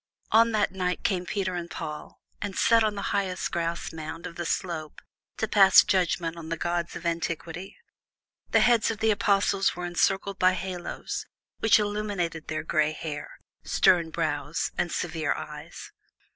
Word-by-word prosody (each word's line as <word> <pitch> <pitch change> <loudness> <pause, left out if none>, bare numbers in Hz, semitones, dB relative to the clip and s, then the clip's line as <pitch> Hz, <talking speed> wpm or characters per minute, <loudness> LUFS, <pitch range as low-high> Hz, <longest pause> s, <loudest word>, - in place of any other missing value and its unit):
On 230 +1 +5
that 210 -2 +1
night 180 -1 -2
came 180 -2 0
Peter 190 -1 -1
and 170 -1 -4
Paul, 150 -3 -7 0.2
and 205 -3 -4
sat 230 -1 +5
on 215 -1 0
the 200 - -3
highest 190 -2 -1
grassmound 165 -1 -4
of 170 - -7
the 175 -1 -4
slope 160 -5 -3 0.4
to 220 - -1
pass 195 -3 +7
judgment 170 -2 0
on 160 -1 -8
the 165 - -2
gods 170 +1 -2
of - - -8
antiquity. 170 +2 -3 0.7
The - - +4
heads 235 -2 +4
of 225 - -2
the 220 +1 +2
Apostles 200 -1 +2
were 180 0 -4
encircled 195 +3 0
by 185 0 +5
halos, 185 -2 -5 0.3
which 225 - +5
illuminated 205 -6 -2
their 155 - -3
gray 155 -1 +1
hair, 150 -2 -6 0.3
stern 170 -3 +3
brows, 150 -2 -2
and 175 - -1
severe 160 -3 -1
eyes. - - -8
175 Hz, 160 wpm, -27 LUFS, 165-200 Hz, 0.7 s, pass